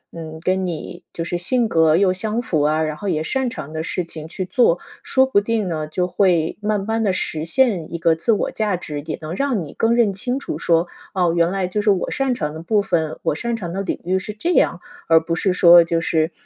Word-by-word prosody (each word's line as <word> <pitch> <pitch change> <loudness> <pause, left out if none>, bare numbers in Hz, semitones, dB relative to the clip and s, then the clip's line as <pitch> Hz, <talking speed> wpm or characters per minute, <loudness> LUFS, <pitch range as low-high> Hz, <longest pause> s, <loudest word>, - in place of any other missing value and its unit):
嗯， 160 -1 -8
跟 185 +1 0
你 175 +1 -6
就 165 - -4
是 175 +1 -2
性 235 +6 +1
格 160 -3 +3
又 190 -1 +3
相 215 +5 -2
符 160 -10 -1
啊， 155 +2 +2
然 155 -1 -2
后 200 +5 -4
也 155 -3 0
擅 265 +6 -1
长 155 - -8
的 160 - -3
事 175 +1 -2
情 155 -2 -7
去 185 - -4
做， 180 -3 +2 0.2
说 265 0 +3
不 235 -6 +2
定 220 -2 -1
呢， 155 -3 -2
就 180 +3 -1
会 180 -3 +1
慢 210 -2 -1
慢 225 0 -1
地 200 - +2
实 160 -4 -2
现 190 -3 +1
一 - - -2
个 165 -1 +2
自 170 +8 0
我 210 - 0
价 210 -4 -1
值， 150 -4 -6
也 155 +2 -5
能 155 +1 -5
让 265 -7 0
你 150 - -10
更 225 +1 +1
认 230 -4 +3
清 245 +7 -2
楚 150 - -5
说， 170 +1 +2 0.3
哦， 175 -3 +2
原 170 0 +3
来 190 -2 -1
就 210 +3 -1
是 210 - +1
我 195 -3 +1
擅 270 -2 0
长 150 -5 -3
的 160 - -7
部 205 +5 +1
分， 160 -5 -1
我 - - 0
擅 235 +6 -2
长 175 -5 -6
的 195 - -2
领 195 - -3
域 185 +1 +1
是 210 +3 -6
这 275 +12 -2
样。 - - +2 0.3
而 165 - +7
不 165 +1 -4
是 185 +3 +1
说 175 -1 +7
就 165 0 0
是， 160 0 0
180 Hz, 265 characters per minute, -20 LUFS, 165-210 Hz, 0.3 s, 而